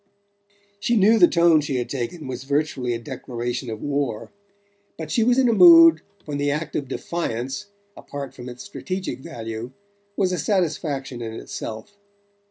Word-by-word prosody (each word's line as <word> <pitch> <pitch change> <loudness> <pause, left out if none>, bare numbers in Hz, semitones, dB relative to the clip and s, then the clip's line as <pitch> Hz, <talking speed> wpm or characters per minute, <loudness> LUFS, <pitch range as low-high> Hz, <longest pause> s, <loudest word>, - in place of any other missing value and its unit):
She 235 +3 +1
knew 215 +3 +5
the 175 - +8
tone 170 -2 +4
she 140 -2 -3
had 125 -1 -1
taken 135 +6 -4
was 130 -1 -5
virtually 140 -4 -1
a - - -2
declaration 120 -1 -5
of 110 -1 -6
war; 140 -6 -2 0.7
but 155 -2 -6
she 225 - +2
was 245 +2 +3
in 265 -1 +4
a 235 - +3
mood 330 +3 +8 0.2
when 145 -2 -4
the 145 0 +1
act 150 +2 -3
of 140 - -2
defiance, 135 - -4 0.3
apart 140 -1 -7
from 125 0 -9
its 125 0 -9
strategic 190 -4 -5
value, 115 -2 -6 0.5
was 190 -3 +2
a 180 - -1
satisfaction 150 - -1
in 115 -1 -5
itself. 110 - -7
145 Hz, 165 wpm, -23 LUFS, 125-180 Hz, 0.7 s, the